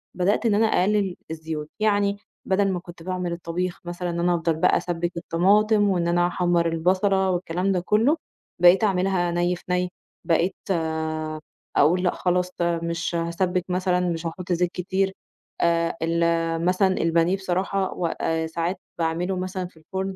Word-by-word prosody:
بدأت 190 +6 +1
إن 215 -3 +3
أنا 220 +2 +4
أقلِّل 195 -2 +1 0.2
الزيوت، 160 -1 -5
يعني 205 -1 +2 0.3
بَدَل 195 +1 +2
ما 180 - -2
كنت 175 -1 -12
باعمل 180 -1 -3
الطبيخ 175 +1 -3
مثلًا 175 +1 -4
إن 170 0 -3
أنا 175 +1 +2
أفضل 165 -1 0
بقى 160 - +3
أسبِّك 175 -1 -2
الطماطم، 205 +5 +3
وإن 175 -3 +1
أنا 175 0 +3
أحمّر 175 -1 +1
البَصَلة، 190 +3 +2
والكلام 180 +1 -1
ده 185 - +1
كُلّه، 220 - +2 0.4
بقيت 180 +4 +7
أعملها 185 -3 +1
نَيّ 175 +1 +1
في - - -14
نَيّ 180 0 +1 0.4
بقيت 170 +2 +2 1.2
أقول 175 +5 +4
لأ 180 - +3
خلاص، 180 0 0
آآ، 170 -1 +1
مش 170 +1 -2
هاسبِّك 170 +2 -1
مثلًا، 180 0 +1
مش 165 0 -3
هاحط 180 +2 -5
زيت 175 0 +1
كتير 190 +2 -1 0.5
آآ، 170 0 +2
ال 165 0 +1
مثلًا 185 +1 +2
البانيه 165 +2 +2
بصراحة، 190 +1 -1
و 175 - -3
آآ، 160 0 -1
ساعات 170 +3 -2 0.2
باعمله 170 +3 -1
مثلًا 185 0 -3
في 175 - -22
الفرن 190 +4 -4
180 Hz, 160 wpm, -24 LUFS, 170-190 Hz, 1.2 s, بقيت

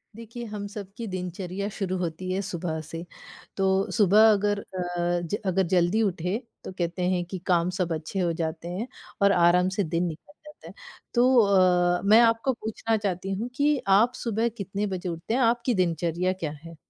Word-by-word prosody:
देखिए 230 +1 -8
हम 210 -2 -6
सबकी 205 +2 -8
दिनचर्या 185 +1 -4
शुरू 185 -2 -2
होती 180 +1 -4
है 190 +1 0
सुबह 175 -4 -4
से, 165 +2 -8 0.5
तो 195 0 +1
सुबह 215 +2 +6
अगर 205 0 +1
अ, 175 -2 -2
ज 170 +3 -3
अगर 190 0 +2
जल्दी 180 +4 +2
उठे, 180 0 -1 0.3
तो - - -7
कहते 175 0 -3
हैं 175 -1 0
कि 185 +1 -6
काम 175 -1 +2
सब 175 -2 0
अच्छे 160 +4 -4
हो 175 -2 +1
जाते 160 +1 -4
हैं 185 +7 -4 0.3
और 200 0 +5
आराम 180 0 +4
से 205 - +2
दिन 170 +1 -1
निकल 165 - -9
जाता 300 - -13
हैं। - - -10 0.4
तो 250 +1 +5 0.6
अ, - - -9
मैं 215 +3 +7
आपको 230 +3 +3
पूछना 225 0 -2
चाहती 195 -2 -3
हूँ 220 +6 -3
कि 290 +2 +2 0.2
आप 235 +4 +3
सुबह 230 0 0
कितने 200 +1 -3
बजे 185 -2 -4
उठते 170 +5 -4
हैं? 260 - +2
आपकी 240 +1 +2
दिनचर्या 175 +1 0
क्या 170 -5 -4
है? 165 0 -10
190 Hz, 185 wpm, -26 LUFS, 175-215 Hz, 0.6 s, मैं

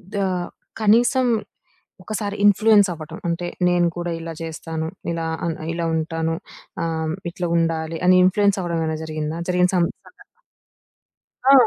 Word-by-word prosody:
The - - 0 0.6
కనీసం 240 +4 +4 0.8
ఒకసారి 205 0 -3
influence 205 0 +6
అవ్వడం. 160 0 -9
అంటే 170 +1 -1 0.2
నేను 175 -1 +3
గూడా 175 0 -2
ఇలా 165 0 -6
జేస్తాను. 160 0 -4 0.2
ఇలా 165 -1 -2 0.2
ఆహ్, 165 - -1 0.2
ఇలా 170 0 -2
ఉంటాను. 160 0 -1 0.5
ఆహ్, 160 -1 -1 0.2
ఇట్లా 175 0 -3
ఉండాలి 165 -1 -1
అని 185 0 +7
ఇన్‌ఫ్లుయెన్స్ 200 +1 +3
అవ్వడం 170 -2 -2
ఏమైనా 160 -1 -1
జరిగిందా? 155 +1 -3
జరిగిన 180 0 +3
సం 175 - +4 0.2
సంఘటన. 410 +2 -18 1.2
ఆ! 270 - +7
170 Hz, 135 wpm, -22 LUFS, 160-200 Hz, 1.2 s, అని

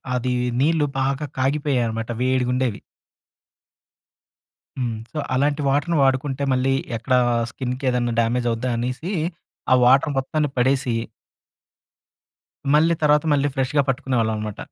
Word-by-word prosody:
అది, 125 0 -1 0.3
నీళ్ళు 155 0 +2
బాగా 135 +2 -1
కాగిపోయ్యేయి 135 -2 +1
అనమాట. 115 0 -4
వేడిగుండెవి. 125 -2 0 2.0
హ్మ్. 120 -3 -2 0.2
సొ 155 - -4 0.2
అలాంటి 145 +3 +1
వాటర్‌ని 150 +5 +1
వాడుకుంటే, 135 +1 +1
మళ్ళీ 130 +1 +1 0.2
ఎక్కడా 125 +3 +1 0.3
స్కిన్‌కేదెన్నా 125 -1 -2
డ్యామేజవుద్దా 120 +1 0
అనీసి, 125 - -3 0.6
ఆ - - +8
వాటర్ 135 +4 +4
మొత్తాన్ని 150 +2 -1
పడేసి... 130 -1 +1 1.8
మళ్ళీ 165 +2 +4
తర్వాత 150 +1 +4
మళ్ళీ 145 0 +2
ఫ్రెష్‌గా 135 +1 +1
పట్టుకునేవాళ్ళం 125 -4 0
అనమాట. 105 -1 -5
130 Hz, 105 wpm, -22 LUFS, 125-145 Hz, 2.0 s, ఆ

